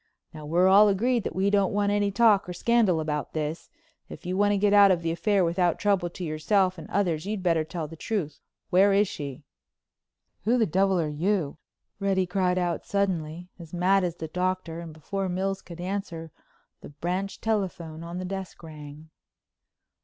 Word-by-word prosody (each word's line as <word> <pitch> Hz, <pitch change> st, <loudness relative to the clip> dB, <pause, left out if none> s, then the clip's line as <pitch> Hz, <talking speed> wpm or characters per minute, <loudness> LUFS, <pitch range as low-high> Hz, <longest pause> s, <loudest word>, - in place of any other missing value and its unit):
Now 155 Hz, -1 st, -9 dB
we're 175 Hz, +4 st, +3 dB
all 200 Hz, +3 st, +7 dB
agreed 235 Hz, +4 st, +1 dB
that -, -, -4 dB
we 195 Hz, +2 st, +1 dB
don't 200 Hz, -2 st, +2 dB
want 205 Hz, 0 st, +1 dB
any 205 Hz, 0 st, +1 dB
talk 205 Hz, -2 st, +3 dB
or -, -, -4 dB
scandal 215 Hz, -3 st, +2 dB
about 150 Hz, -2 st, -3 dB
this. 155 Hz, +1 st, -4 dB, 0.4 s
If -, -, -11 dB
you 180 Hz, +1 st, -2 dB
want 205 Hz, +1 st, +3 dB
to 205 Hz, -, +2 dB
get 205 Hz, +1 st, +2 dB
out 200 Hz, -1 st, +8 dB
of 175 Hz, -3 st, +1 dB
the 165 Hz, -, 0 dB
affair 195 Hz, +2 st, +1 dB
without 175 Hz, 0 st, +1 dB
trouble 195 Hz, -4 st, +1 dB
to 180 Hz, +2 st, -8 dB
yourself 185 Hz, +4 st, +1 dB
and 160 Hz, -, -10 dB
others 175 Hz, -3 st, 0 dB
you'd 205 Hz, -3 st, -3 dB
better 165 Hz, -3 st, +2 dB
tell 160 Hz, 0 st, -5 dB
the 165 Hz, -, -10 dB
truth. 175 Hz, -3 st, -3 dB, 0.3 s
Where 195 Hz, +2 st, +5 dB
is 200 Hz, +1 st, +3 dB
she?" 140 Hz, -7 st, -7 dB, 1.0 s
"Who 235 Hz, +3 st, +3 dB
the 230 Hz, -, +3 dB
devil 190 Hz, +1 st, +2 dB
are 160 Hz, -, 0 dB, 0.2 s
you?" 175 Hz, -9 st, 0 dB, 0.4 s
Reddy 195 Hz, -2 st, +1 dB
cried 180 Hz, 0 st, 0 dB
out 175 Hz, -2 st, -1 dB
suddenly, 180 Hz, -4 st, -2 dB
as 170 Hz, 0 st, -9 dB
mad 190 Hz, +2 st, +3 dB
as 175 Hz, -2 st, -2 dB
the 160 Hz, -, -6 dB
Doctor, 180 Hz, 0 st, -2 dB
and 170 Hz, -1 st, -8 dB
before 190 Hz, +5 st, -4 dB
Mills 190 Hz, +2 st, -2 dB
could 170 Hz, -1 st, -11 dB
answer, 175 Hz, -3 st, -4 dB, 0.5 s
the -, -, -10 dB
branch 180 Hz, +7 st, -3 dB
telephone 175 Hz, -7 st, -3 dB
on 170 Hz, +1 st, -6 dB
the 185 Hz, -, -4 dB
desk 190 Hz, -1 st, -6 dB
rang. 155 Hz, 0 st, -11 dB
185 Hz, 190 wpm, -26 LUFS, 165-200 Hz, 1.0 s, out